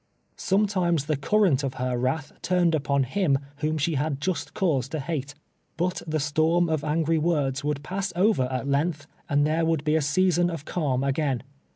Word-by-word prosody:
Sometimes 185 -6 +1
the 155 0 0
current 160 0 +2
of 135 -2 -3
her 130 -1 -1
wrath 135 +4 -1
turned 175 -2 +2
upon 140 -2 +1
him 140 +1 +1 0.2
whom 155 +2 -1
she 155 +3 0
had 145 0 -1
jus.t 185 +4 -2
cause 145 - +1
to 155 - -3
hate. 145 -2 -4 0.4
But 180 +2 -1
the 155 0 0
storm 160 +4 +2
of 155 -2 0
angry 160 +1 +1
words 145 -4 0
would 145 -1 -2
pass 195 +3 -3
over 185 - +3
at 130 +1 -3
length, 145 +2 0 0.2
and 145 0 +3
there 160 +2 +1
would 160 -3 +1
be 155 0 +2
a 160 - +3
season 175 +4 +2
of 165 -4 -6
calm 135 -7 -1
again. 140 -2 0
155 Hz, 185 wpm, -26 LUFS, 140-170 Hz, 0.4 s, over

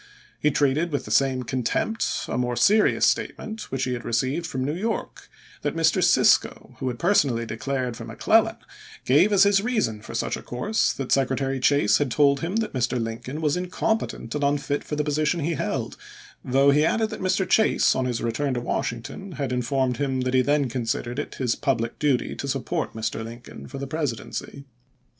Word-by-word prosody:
He 150 - +3
treated 150 +3 +1
with 145 - -2
the - - -7
same 130 -2 +2
contempt 130 - -1
a - - -3
more 125 0 -1
serious 210 - +4
statement 220 0 -2
which 135 0 -1
he 125 -1 -1
received 130 +8 -1
from 130 -1 -3
New 145 - -1
York 215 +6 -4 0.3
that - - -2
Mr. - - +2
Cisco, - - +3
who 130 - -3
had 125 -1 -2
personally 140 - +2
declared 125 +2 -3
for - - -8
McClellan, - - +2 0.5
gave 150 +11 +4
as 195 -2 +6
his 200 -1 +4
reason 215 - -1
for - - -9
such - - -1
a - - -8
course 205 - 0
that 135 -2 -5
Secretary 135 0 +1
Chase 130 -5 +3
had 145 -2 0
told 140 +2 +3
him 170 +7 -3
that 225 -1 -1
Mr. 125 -1 0
Lincoln 115 +6 -5
was 150 -2 +1
incompetent 180 - -2
and 145 -1 -2
unfit 145 0 0
for 150 - -4
the 150 - 0
position 155 +3 0
he 165 +3 0
held, - - -3 0.5
though 135 +2 +4
he 150 +2 +3
added 220 +7 +1
that - - -6
Mr. 185 0 +1
Chase, 220 +4 +3
on 130 - -1
his 120 -2 -2
return 130 +3 -1
to - - 0
Washington, 120 - -4
had 140 -3 -3
informed 125 0 0
him 135 -2 -1
that 130 0 -1
he 130 - +5
then 145 +1 +2
considered 120 +1 -3
it 145 - -5
his 125 -3 0
public 120 -5 -1
duty 140 -4 +1
to 140 - -5
support 140 +4 -2
Mr. 110 0 -3
Lincoln 115 +2 -10
for 140 - -8
the 140 - -4
Presidency. 140 -1 -4
140 Hz, 190 wpm, -24 LUFS, 125-155 Hz, 0.5 s, as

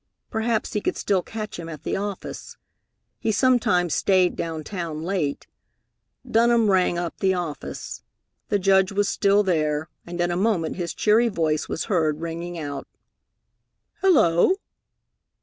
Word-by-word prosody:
Perhaps 220 0 -1
he 210 - 0
could - - -1
still 195 -3 +1
catch 215 -1 -6
him 165 -1 -6
at 155 -3 -8
the - - -1
office. 200 -1 -5 0.6
He 225 - 0
sometimes 205 - +2
stayed 185 -2 +3
down 160 -2 -4
town 165 -3 -5
late. 170 -6 -2 0.8
Dunham 230 -2 +4
rang 180 -2 +2
up 170 -1 -4
the 190 -1 +2
office. 170 -5 -5 0.5
The 205 - +3
Judge 190 0 +3
was 200 0 +1
still 200 0 +3
there, 155 -4 0 0.2
and 175 0 -6
in 175 0 +1
a - - -1
moment 185 -4 0
his 175 -2 -4
cheery 225 +3 +3
voice 160 -6 -1
was - - -2
heard 160 -7 +1
ringing 170 +1 -5
out, 145 -3 -5 1.1
"Hello!" 335 - +4
180 Hz, 145 wpm, -24 LUFS, 165-210 Hz, 1.1 s, Dunham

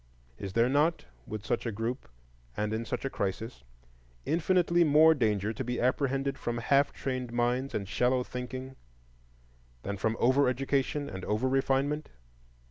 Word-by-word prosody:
Is 95 -1 -5
there 115 +2 +4
not, 150 +5 +2 0.2
with 105 -1 -6
such 120 - -1
a - - -1
group 115 +5 -4 0.5
and 105 +1 -1
in 115 +1 -2
such - - -4
a - - 0
crisis, 100 - -4 0.6
infinitely 175 +1 +3
more 155 +1 +6
danger 110 -6 0
to 130 - -4
be 125 0 -3
apprehended 135 +2 0
from 120 0 -2
half 140 +4 +3
trained 130 -3 -4
minds 120 +3 0
and 100 -2 -2
shallow 125 +4 +1
thinking 130 +2 -6 1.1
than 100 0 -3
from 110 +3 -1
over 130 +3 +4
education 135 +2 -1
and 95 -1 -7
over 110 +5 0
refinement? 135 +3 0
125 Hz, 150 wpm, -30 LUFS, 115-140 Hz, 1.1 s, more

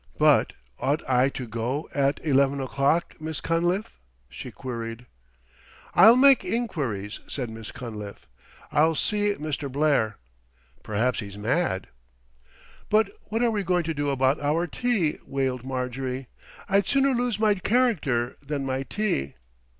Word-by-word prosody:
But - - +4 0.3
ought 145 +3 -1
I 130 +1 +3
to 130 -2 -6
go 120 +6 -3
at 140 0 +1
eleven 140 -1 +3
o'clock, 140 +5 0
Miss 155 -1 -4
Cunliffe?" 175 - -1 0.3
she 70 - -8
queried. 115 -1 -6 0.9
"I'll 225 +3 +8
make 270 +1 +6
enquiries," 135 - -2
said 125 -5 -4
Miss 110 -1 -8
Cunliffe. 105 -4 -8 0.5
"I'll 160 +2 +3
see 205 +5 +1
Mr. 150 -3 -4
Blair. 140 -7 +1 0.6
Perhaps 115 +4 0
he's 100 -2 -7
mad." 110 - 0 1.0
"But 215 -1 +3
what 225 +2 -1
are 235 - +3
we 210 -2 0
going 180 -2 +1
to 165 0 -2
do 145 -1 -1
about 135 +1 +2
our 155 +4 +1
tea?" 190 -3 0
wailed 130 -2 -2
Marjorie. 130 0 -4 0.4
"I'd 200 -1 +2
sooner 275 0 +3
lose 245 -3 0
my 215 -1 +4
character 185 - +1
than 140 -1 -3
my 130 0 -1
tea." 135 - -2
140 Hz, 135 wpm, -26 LUFS, 125-185 Hz, 1.0 s, I'll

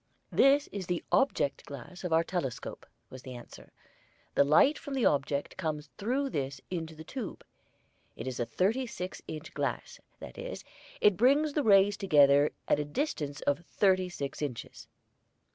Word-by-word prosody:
"This 280 +2 +5
is 195 -3 -5
the 175 -1 -1
object 265 - +2
glass 145 +7 -9
of 180 - -3
our 165 +1 +4
telescope," 165 -8 -4 0.2
was 130 - -9
the 130 -1 -8
answer. 120 - -12 0.6
"The - - +5
light 210 - +5
from 285 -4 -6
the 255 - +1
object 140 0 0
comes 150 -2 -3
through 260 +6 0
this 135 -1 -3
into 165 -3 -4
the 160 - -9
tube. 225 +4 -6 0.7
It - - -7
is 130 -1 -4
a 120 - +1
thirty 215 - 0
six 185 -5 -6
inch 155 0 -7
glass; - - -3 0.2
that - - -10
is, - - -6 0.4
it 205 -4 +5
brings 285 +6 +4
the 300 - +1
rays 200 -3 +5
together 145 -6 +5 0.2
at - - +3
a - - +1
distance 145 - -3
of 145 +1 +1
thirty 185 0 +2
six 140 -5 -5
inches." 135 -6 -5
175 Hz, 165 wpm, -30 LUFS, 145-230 Hz, 0.7 s, This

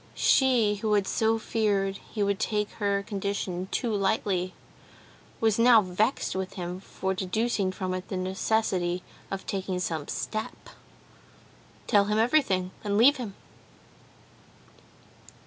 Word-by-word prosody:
She 240 -6 +3
who 215 +1 0
had 205 -2 +3
so 225 +3 +1
feared 200 -3 0
he 210 - -4
would 200 0 0
take 210 -1 -1
her 200 -1 +1
condition 200 -3 -3
too 235 -4 -1
lightly 195 -2 0 0.8
was 220 -1 +2
now 230 -2 +7
vexed 205 +8 0
with 190 0 -3
him 180 -1 -5
for 190 0 -3
deducing 195 +1 0
from 185 -1 -3
it 185 0 -5
the 190 - -3
necessity 185 -1 0 0.3
of 195 -1 -5
taking 190 -2 -2
some 160 -4 -3
step. 215 0 -5 1.2
"Tell 205 -3 +4
him 210 +1 0
everything, 220 -7 +2
and 205 -1 0
leave 270 +7 +6
him." 220 -6 -6
200 Hz, 130 wpm, -27 LUFS, 185-220 Hz, 1.2 s, now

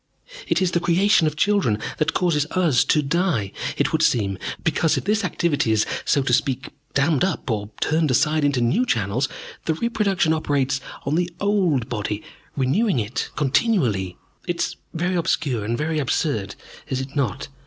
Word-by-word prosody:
It - - +2
is 180 - +1
the 170 - +2
creation 175 0 +3
of 155 - -2
children 195 - +2 0.2
that 155 +1 +1
causes 155 -5 +1
us 165 -8 +2
to 150 - +2
die, 145 - 0 0.3
it - - +1
would - - +1
seem, 100 -5 +1 0.2
because 160 -1 +2
if - - -2
this 210 +1 +1
activity 170 - 0
is, 110 -1 +3 0.2
so 140 - +2
to 120 - 0
speak, 135 +1 0 0.3
dammed 140 0 +2
up 190 -8 -1
or 105 -2 -2
turned 155 0 +2
aside 150 +4 +2
into 140 -3 +2
new 120 - +2
channels, 120 - 0 0.4
the 160 - +1
reproduction 200 -6 +1
operates 140 -3 0 0.2
on 140 - -1
the 175 +2 +1
old 185 - +1
body, 105 -4 -3 0.3
renewing 165 - +2
it 115 +1 -2
continually. 130 - +1 0.3
It - - -1
is - - -1 0.2
very 175 +3 -1
obscure 145 - 0
and 115 +3 -1
very 155 +2 -1
absurd, 115 -5 -1 0.3
is 130 - -2
it 130 +2 -6
not? 135 -2 -1
145 Hz, 170 wpm, -22 LUFS, 125-175 Hz, 0.4 s, creation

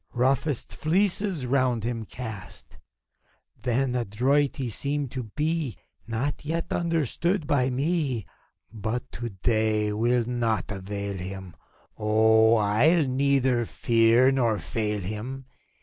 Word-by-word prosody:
Roughest 130 +2 0
fleeces 185 -2 +1
round 125 -3 +1
him 115 -1 -3
cast! 110 -4 -9 0.8
Then 125 +1 0
adroit 125 +5 +1
he 130 -3 -3
seemed 140 +3 -2
to 130 -3 -4
be, 155 - -1 0.3
Not 120 +6 -2
yet 165 +3 -2
understood 170 - 0
by 130 -3 +2
me: 135 - -1 0.5
But 115 +4 -4
to 120 -1 -5
day 110 +1 +1
't 105 - -3
will 120 +1 +2
naught 115 -4 -1
avail 100 0 -4
him 95 -1 -7 0.2
— - - -35
Oh, 110 +1 +4
111 125 +7 +3
neither 130 -3 +2
fear 115 +3 +4
nor 120 -5 +1
fail 105 +3 -2
him 110 +8 -5
120 Hz, 120 wpm, -26 LUFS, 110-140 Hz, 0.8 s, Oh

